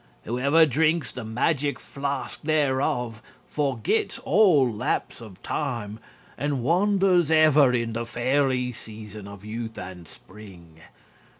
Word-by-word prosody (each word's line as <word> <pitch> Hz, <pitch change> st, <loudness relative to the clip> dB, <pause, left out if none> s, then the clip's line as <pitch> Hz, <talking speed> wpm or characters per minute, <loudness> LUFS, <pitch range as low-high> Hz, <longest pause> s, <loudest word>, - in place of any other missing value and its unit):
Whoever 140 Hz, +7 st, +3 dB
drinks 155 Hz, +1 st, +1 dB
the 125 Hz, -, -7 dB
Magic 140 Hz, +6 st, -1 dB
Flask 140 Hz, -1 st, -5 dB
thereof 130 Hz, -7 st, 0 dB, 0.2 s
Forgets 135 Hz, -7 st, -1 dB
all 165 Hz, -7 st, +4 dB
lapse 110 Hz, +1 st, -3 dB
of 105 Hz, -5 st, -13 dB
time 115 Hz, -7 st, -3 dB, 0.4 s
And 140 Hz, -2 st, -1 dB
wanders 185 Hz, +1 st, +3 dB
ever 155 Hz, -4 st, +5 dB
in 115 Hz, -2 st, -1 dB
the 115 Hz, +1 st, -4 dB
fairy 125 Hz, +1 st, 0 dB
season 110 Hz, -3 st, -10 dB
Of 100 Hz, 0 st, -11 dB
youth 110 Hz, +1 st, -6 dB
and 90 Hz, -2 st, -8 dB
spring. 90 Hz, -4 st, -15 dB
125 Hz, 115 wpm, -25 LUFS, 110-150 Hz, 0.4 s, ever